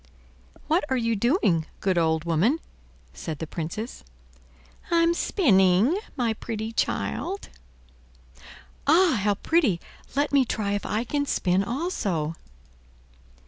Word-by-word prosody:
"What 320 +4 +2
are 260 - +1
you 230 -1 +1
doing, 205 - +2
good 190 -1 +1
old 160 -1 +1
woman?" 175 - +2 0.6
said 160 -3 -5
the 160 - -4
Princess. 170 - -5 0.9
"I'm 335 0 +4
spinning 205 - +3 0.2
my 240 -5 0
pretty 220 0 -5
child." 380 +10 -2 1.4
"Ah, 325 - +5
how 205 0 +2
pretty! 260 - +2 0.4
Let 285 +1 +1
me 280 -2 +5
try 215 -4 -2
if 205 0 -2
I 215 +2 0
can 285 +3 -1
spin 185 -4 +1
also." 200 - -2
220 Hz, 115 wpm, -25 LUFS, 185-285 Hz, 1.4 s, Ah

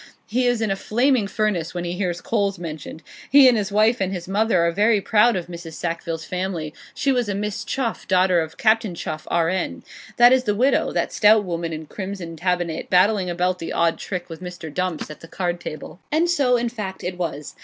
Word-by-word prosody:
He 245 +3 0
is 245 -2 +1
in 215 - 0
a - - +1
flaming 240 +2 +1
furnace 195 -5 -1
when 175 - -2
he 175 0 -3
hears 180 -2 -2
coals 200 -3 0
mentioned. 160 -2 -7 0.3
He 275 -1 +8
and 250 - +5
his 210 -2 -1
wife 215 +3 +3
and 190 0 0
his 175 -3 -5
mother 195 -3 +2
are 170 - +2
very 210 +4 +3
proud 220 +4 +3
of 180 -2 -2
Mrs. 170 -2 -9
Sackville's 165 -1 -4
family; 180 -4 -3 0.2
she 275 - +1
was 245 -4 0
a 200 - -1
Miss 205 0 -3
Chuff, 245 -4 -3
daughter 185 -1 +3
of 160 0 -6
Captain 220 -4 +2
Chuff, 155 -1 -6
R.N. 170 - 0 0.3
That 240 +1 +7
is 260 0 +2
the 210 -2 +1
widow; 255 +6 +2
that - - -1
stout 210 0 +5
woman 170 -2 -3
in 160 0 -6
crimson 190 -1 -6
tabinet, 175 -1 -2
battling 185 +1 +3
about 180 +1 0
the 165 - -5
odd 165 -1 +1
trick 180 -3 -5
with 165 +1 -9
old 180 - -5
Mr. 160 -4 -9
Dumps, 180 -3 -2
at 150 - -10
the 165 - -12
card 175 0 -2
table.' 155 +3 -8
And 320 +3 +2
so, 275 -8 +3
in 240 0 -1
fact, 210 -5 -6
it 180 +1 -3
was. 150 -4 -4
185 Hz, 220 wpm, -22 LUFS, 170-215 Hz, 0.3 s, He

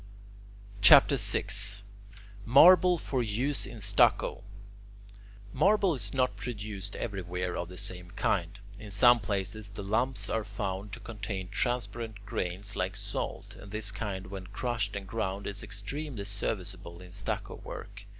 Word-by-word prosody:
CHAPTER 95 - +8
VI - - +1 1.0
MARBLE 175 - +7
FOR 135 -5 -2
USE 120 +6 -1
IN 120 - -9
STUCCO 100 0 +3 1.1
Marble 200 -3 +3
is 105 -8 -2
not 130 -1 +1
produced 105 -4 -5
everywhere 90 -4 -3
of 85 - -4
the 90 - -10
same 90 -1 -2
kind. 95 -2 -1 0.2
In 105 - -9
some 120 +4 +6
places 100 0 -3
the 100 0 -7
lumps 120 +6 0
are 110 - -1
found 100 -1 -4
to - - -6
contain 100 -4 -5
transparent 110 -2 -2
grains 100 +1 -3
like 95 +1 -1
salt, 100 0 -4
and 100 - -12
this 105 -1 -1
kind 100 -1 -4
when 95 0 -8
crushed 105 0 -2
and 100 -1 -5
ground 100 -1 -3
is 100 0 -3
extremely 110 +4 -3
serviceable 95 -3 -5
in 90 -1 -12
stucco 100 +1 -4
work. 100 0 -9
100 Hz, 140 wpm, -30 LUFS, 95-115 Hz, 1.1 s, CHAPTER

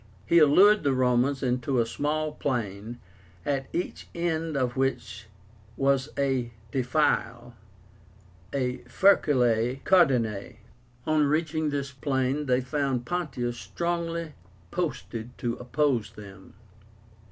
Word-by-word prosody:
He 170 - +5
allured 190 +8 +6
the 140 -2 +1
Romans 130 +2 +2
into 125 +1 0
a 115 - +3
small 150 +5 -2
plain, 115 -5 -3 0.5
at 135 -2 -1
each 175 - -4
end 165 -3 -1
of 125 -2 0
which 110 -6 -2 0.5
was 135 +1 +1
a 135 -4 0 0.2
defile 125 -2 0 1.0
(Furculae 130 - +2
Caudinae). 125 - +2 0.5
On 155 -1 +3
reaching 155 +1 0
this 140 -1 -3
plain 135 +1 -1
they 125 0 +2
found 135 -2 -1
Pontius 130 -9 -3
strongly 170 -2 -3 0.4
posted 125 -8 -4
to 120 -1 -2
oppose 125 -2 0
them. 100 -2 -13
135 Hz, 105 wpm, -27 LUFS, 120-155 Hz, 1.0 s, allured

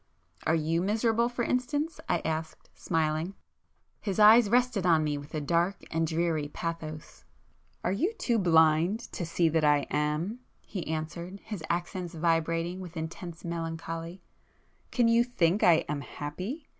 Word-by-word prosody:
"Are 160 - +4
you 165 +1 +1
miserable, 225 +4 +2
for 245 0 -2
instance?" 290 +7 -1
I - - +1
asked, 160 0 -4
smiling. 160 +2 -1 0.6
His 195 -3 -3
eyes 215 +1 +7
rested 245 -3 +2
on 165 -3 +4
me 150 -1 0
with 145 +2 -8
a - - 0
dark 170 +6 0
and 165 0 +1
dreary 160 -2 0
pathos. 155 0 -6 0.6
"Are 180 - +1
you 320 - +1
too 235 - 0
blind 165 +3 +4
to 175 - -4
see 170 0 +2
that 160 0 +1
I 145 -1 +4
am?" 150 +9 -1 0.3
he 185 -5 -5
answered, 170 +4 -4
his 210 -7 -6
accents 175 0 -3
vibrating 165 +2 0
with 180 -2 -8
intense 165 +1 -6
melancholy—"Can 165 +7 -5
you 230 +1 +5
think 200 -6 +1
I 165 -2 +5
am 150 -1 -2
happy? 185 - -6
170 Hz, 145 wpm, -29 LUFS, 160-205 Hz, 0.6 s, eyes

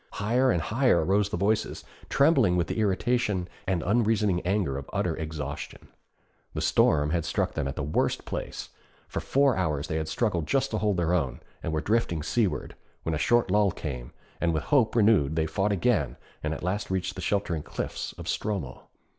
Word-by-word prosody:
Higher 120 +6 +2
and 85 -9 +1
higher 110 - +2
rose 100 +2 +2
the - - -2
voices, 105 +4 0 0.3
trembling 135 - +4
with 85 - +2
the 100 - -3
irritation 105 -2 +1 0.2
and 90 -3 0
unreasoning 105 -3 +2
anger 95 -6 0
of 70 0 -6
utter - - 0
exhaustion. 75 -3 -6 0.7
The - - -1
storm 75 0 +3
had 85 -1 +1
struck 75 - -1
them - - -2
at 70 - -4
the 75 - -3
worst 75 +2 0
place; - - -5 0.4
for - - -3
four 140 -2 +3
hours 75 -5 -1
they 80 - -1
had 80 -1 -2
struggled 85 -2 0
just 135 - +1
to 110 - 0
hold 105 -3 +1
their 85 0 +1
own, 75 -8 0 0.2
and - - -3
were 80 -1 0
drifting 100 -8 0
seaward, 95 - 0 0.3
when 80 - -1
a 75 - -1
short 120 +7 +3
lull 105 -1 +4
came, 65 -8 -5 0.3
and 85 -2 +2
with 75 - -1
hope 125 -7 +2
renewed 100 -10 +4
they 80 -1 +1
fought 95 +6 0
again 90 - +1 0.2
and 75 +1 -2
at - - -8
last 100 +4 -2
reached 95 0 -1
the - - -7
sheltering 90 -6 0
cliffs - - -5
of - - -9
Stromö. 95 -12 -3
90 Hz, 190 wpm, -27 LUFS, 80-105 Hz, 0.7 s, trembling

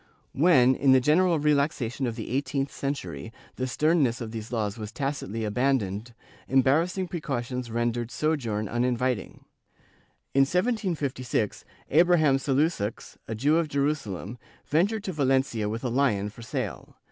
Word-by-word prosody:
^ - - -32 0.3
When, 135 -4 +5
in 135 0 +4
the 130 - +6
general 165 +6 +3
relaxation 140 -4 0
of 115 - -3
the 115 -1 -6
eighteenth 135 +1 -1
century, 140 -4 -4 0.3
the 130 - -1
sternness 145 -3 +2
of 115 -3 -5
these 110 0 -7
laws 110 -4 -1
was 105 -1 -6
tacitly 125 -5 -3
abandoned, 115 -2 -1 0.3
embarrassing 160 +8 +2
pre 170 -2 -5
cautions 125 -3 -3
rendered 120 0 -1
sojourn 120 -9 -1
uninviting. 120 -1 -1 0.9
In 135 - +5
1756, 150 - 0 0.3
Abraham 155 -3 +5
Salusox, 135 -5 -1
a 110 - -3
Jew 145 +8 +3
of 165 -1 +1
Jerusalem, 140 - -2 0.3
ventured 200 +8 +1
to 190 - -3
Valencia 130 -7 +1
with 115 +3 -4
a 125 - 0
lion 115 -6 +1
for 110 - -13
sale. 115 - -5
130 Hz, 140 wpm, -27 LUFS, 115-150 Hz, 0.9 s, the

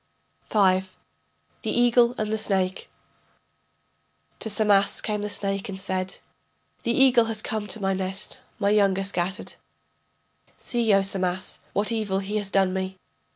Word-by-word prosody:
V. 190 -3 +4 0.8
THE - - -3
EAGLE 240 0 +4
AND 215 0 -2
THE - - +1
SNAKE 190 -3 0 1.5
To 220 - -2
Samas 205 -2 +3
came 210 -1 -2
the 210 - -3
snake 195 0 -1
and 190 -1 -4
said: 190 -1 -2 0.6
The 235 - 0
eagle 245 -2 +5
has 220 -1 -1
come 215 -1 -3
to 220 - -3
my 195 -1 0
nest, 190 +1 -3 0.2
my 200 -2 +1
young 200 -2 +3
are 195 - -1
scattered. 190 +1 -2 1.0
See, 235 -3 0
O 195 - +3
Samas, 185 -1 -1
what 205 +3 +1
evil 215 -4 -1
he 200 +2 -2
has 205 -2 -1
done 195 -2 +2
me. 190 0 -3
200 Hz, 150 wpm, -25 LUFS, 190-215 Hz, 1.5 s, eagle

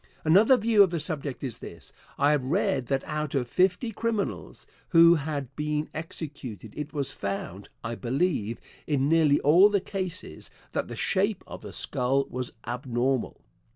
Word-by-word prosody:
Another 205 +11 +6
view 220 -2 +4
of 195 - +6
the 170 -1 -2
subject 145 -3 -3
is 130 -4 -4
this: - - -10 0.2
I 145 +1 +4
have 150 -3 +1
read 130 -1 0
that 135 +1 0
out 150 -2 -3
of 125 -3 0
fifty 185 - +1
criminals 225 -1 -3 0.2
who 170 0 +7
had 145 -4 -3
been 150 0 -2
executed 145 - -6
it 150 0 -5
was 140 -4 -1
found, 100 -1 -5
I 115 - -3
believe, 120 - -1 0.3
in 140 -2 +1
nearly 155 -2 +4
all 175 +8 +6
the 205 -1 +2
cases, 185 -2 -5 0.2
that - - -2
the - - -7
shape 200 0 0
of - - -9
the - - -8
skull 135 0 0
was 125 0 -4
abnormal. 125 +1 -1
150 Hz, 160 wpm, -27 LUFS, 130-175 Hz, 0.3 s, who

